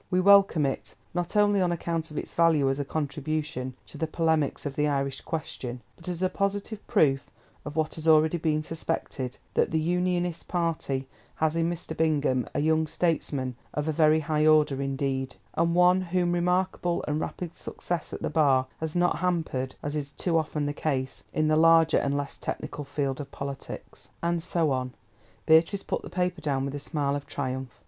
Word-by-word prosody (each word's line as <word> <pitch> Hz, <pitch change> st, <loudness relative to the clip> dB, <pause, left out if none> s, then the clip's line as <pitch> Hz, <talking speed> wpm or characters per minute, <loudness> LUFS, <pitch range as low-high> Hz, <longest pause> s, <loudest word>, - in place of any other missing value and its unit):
We 185 Hz, -, +2 dB
welcome 195 Hz, -5 st, +6 dB
it, 135 Hz, -, -3 dB, 0.2 s
not 175 Hz, +3 st, -2 dB
only 205 Hz, -1 st, +4 dB
on 180 Hz, -1 st, +2 dB
account 165 Hz, -1 st, -2 dB
of 150 Hz, -, -8 dB
its -, -, -4 dB
value 165 Hz, -4 st, +4 dB
as 135 Hz, -, -2 dB
a -, -, 0 dB
contribution 150 Hz, -2 st, -3 dB
to -, -, -12 dB
the 160 Hz, -, 0 dB
polemics 160 Hz, -3 st, 0 dB
of 140 Hz, -2 st, -3 dB
the 150 Hz, 0 st, +2 dB
Irish 140 Hz, -2 st, -1 dB
Question, 130 Hz, -6 st, -4 dB, 0.2 s
but 165 Hz, -, -13 dB
as 180 Hz, +1 st, -3 dB
a -, -, +4 dB
positive 200 Hz, +2 st, -2 dB
proof 140 Hz, -, +2 dB, 0.4 s
of 150 Hz, -, -6 dB
what 155 Hz, -1 st, 0 dB
has 160 Hz, 0 st, -6 dB
already 160 Hz, +2 st, +5 dB
been 155 Hz, -1 st, +1 dB
suspected, 155 Hz, -5 st, -3 dB, 0.2 s
that -, -, +2 dB
the 160 Hz, -, +1 dB
Unionist 175 Hz, +1 st, 0 dB
party 160 Hz, -6 st, -1 dB, 0.3 s
has 160 Hz, 0 st, +1 dB
in 165 Hz, 0 st, +1 dB
Mr. 170 Hz, -2 st, -5 dB
Bingham 145 Hz, -6 st, +1 dB
a -, -, +1 dB
young 160 Hz, +1 st, +2 dB
statesman 145 Hz, -6 st, -1 dB, 0.2 s
of 150 Hz, +1 st, -1 dB
a -, -, +2 dB
very 155 Hz, 0 st, +4 dB
high 155 Hz, 0 st, +1 dB
order 150 Hz, -3 st, +4 dB
indeed, 135 Hz, -1 st, -2 dB, 0.2 s
and 170 Hz, +1 st, +1 dB
one 180 Hz, +1 st, +5 dB
whom 180 Hz, -1 st, 0 dB
remarkable 180 Hz, 0 st, 0 dB
and 150 Hz, +1 st, 0 dB
rapid 175 Hz, -2 st, -5 dB
success 175 Hz, -3 st, -4 dB
at -, -, -6 dB
the -, -, 0 dB
Bar 140 Hz, -5 st, +4 dB
has 160 Hz, 0 st, -4 dB
not 175 Hz, 0 st, +2 dB
hampered, 160 Hz, -8 st, -1 dB
as 145 Hz, +1 st, -3 dB
is 145 Hz, -2 st, -2 dB
too 170 Hz, +3 st, -2 dB
often 155 Hz, -2 st, 0 dB
the 145 Hz, -, -1 dB
case, 135 Hz, -4 st, -2 dB
in 155 Hz, 0 st, +1 dB
the 155 Hz, -, +3 dB
larger 165 Hz, 0 st, +6 dB
and 140 Hz, 0 st, 0 dB
less 145 Hz, -1 st, -4 dB
technical 145 Hz, -, -4 dB
field 140 Hz, -1 st, -2 dB
of 140 Hz, -, -8 dB
politics." 140 Hz, 0 st, -7 dB
And 170 Hz, 0 st, +1 dB
so 165 Hz, -3 st, +1 dB
on. 130 Hz, -1 st, -1 dB, 0.5 s
Beatrice 165 Hz, +5 st, +4 dB
put -, -, -2 dB
the -, -, -9 dB
paper 180 Hz, 0 st, -1 dB
down 135 Hz, -2 st, 0 dB
with 140 Hz, -, -4 dB
a 145 Hz, -, -4 dB
smile 140 Hz, -2 st, -1 dB
of 145 Hz, 0 st, -5 dB
triumph. 130 Hz, -2 st, -4 dB
155 Hz, 190 wpm, -27 LUFS, 140-170 Hz, 0.5 s, welcome